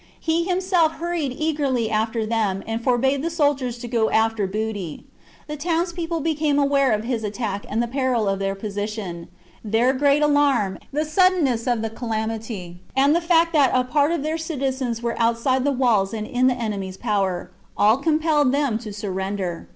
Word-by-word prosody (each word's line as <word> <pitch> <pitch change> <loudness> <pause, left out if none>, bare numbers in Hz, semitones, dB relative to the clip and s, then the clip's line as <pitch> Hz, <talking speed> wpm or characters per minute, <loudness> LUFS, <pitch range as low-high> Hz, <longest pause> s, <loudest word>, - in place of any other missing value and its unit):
He 330 +1 0
himself 360 -3 +2
hurried 335 -5 -2
eagerly 280 -8 0
after 220 +1 0
them, 215 -4 -1
and 225 +1 -3
forbade 265 +2 +2
the 330 - -1
soldiers 285 -7 0
to 240 0 -7
go 230 -2 +1
after 220 -2 +1
booty. 205 -4 -4 0.4
The 300 - -5
towns 340 +3 -1
people 335 -1 -3
became 305 -2 +1
aware 280 -2 +3
of 215 0 0
his 235 -2 -2
attack 205 -1 -3
and 225 +3 0
the - - -2
peril 255 -4 0
of 195 0 0
their 195 0 -1
position; 205 -4 -5 0.4
their 225 +4 +2
great 285 +2 +3
alarm, 280 -10 +2
the 300 +2 -1
suddenness 310 -8 +2
of 240 -3 +1
the 225 - -1
calamity, 220 -6 -4 0.2
and 280 +3 +4
the 340 - +2
fact 335 0 +3
that 285 -4 +5
a 255 - +3
part 290 +4 +1
of 335 -4 -1
their 315 +2 -2
citizens 265 -6 -2
were 235 0 -2
outside 235 +3 +1
the 285 - +2
walls 230 -6 +1
and 215 -1 -4
in 255 +1 +1
the 255 - +2
enemy's 200 -5 -4
power, 190 -4 -1 0.3
all 215 +3 +5
compelled 305 -2 +2
them 275 -5 0
to 220 -2 -8
surrender. 190 -3 -4
245 Hz, 180 wpm, -22 LUFS, 215-295 Hz, 0.4 s, that